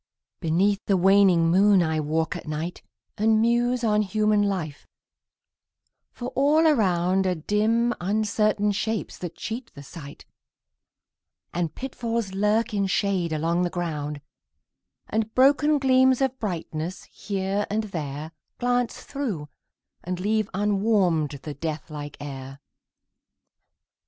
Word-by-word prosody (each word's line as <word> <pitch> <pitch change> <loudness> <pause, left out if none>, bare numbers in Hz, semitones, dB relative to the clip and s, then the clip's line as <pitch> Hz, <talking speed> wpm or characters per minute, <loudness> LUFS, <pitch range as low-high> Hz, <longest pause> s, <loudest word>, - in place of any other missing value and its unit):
Beneath 195 +5 +1
the 195 - +3
waning 185 -3 +5
moon 195 0 +5
I 160 -1 0
walk 160 +2 -1
at - - -8
night, 155 +3 -4 0.4
And 220 +1 +4
muse 240 +2 +2
on 210 -2 +3
human 210 0 +2
life 180 -8 -3 1.2
for 245 0 -6
all 295 +5 +3
around 190 - +2
Are 180 - +1
dim 220 +7 +1
uncertain 210 +1 +1
shapes 215 +2 -3
that 175 -2 -6
cheat 230 +2 -6
the 140 - -10
sight, 145 -1 -11 1.3
And 170 -3 -2
pitfalls 235 -5 -3
lurk 210 +4 +1
in 200 -1 +1
shade 190 -3 0
along 165 +3 0
the 180 - +1
ground, 150 -5 -4 0.9
And 220 0 -1
broken 290 +3 +4
gleams 260 -1 +4
of 265 -1 0
brightness, 170 -3 -4
here 195 +1 -3
and 215 +2 0
there, 155 -5 -5 0.3
Glance 245 0 -1
through, 215 - -4 0.5
and 180 0 -4
leave 215 +2 0
unwarmed 195 -7 +1
the 150 - -5
death 155 -1 -5
like 145 -1 -7
air. 135 -1 -8
195 Hz, 120 wpm, -25 LUFS, 165-220 Hz, 1.3 s, waning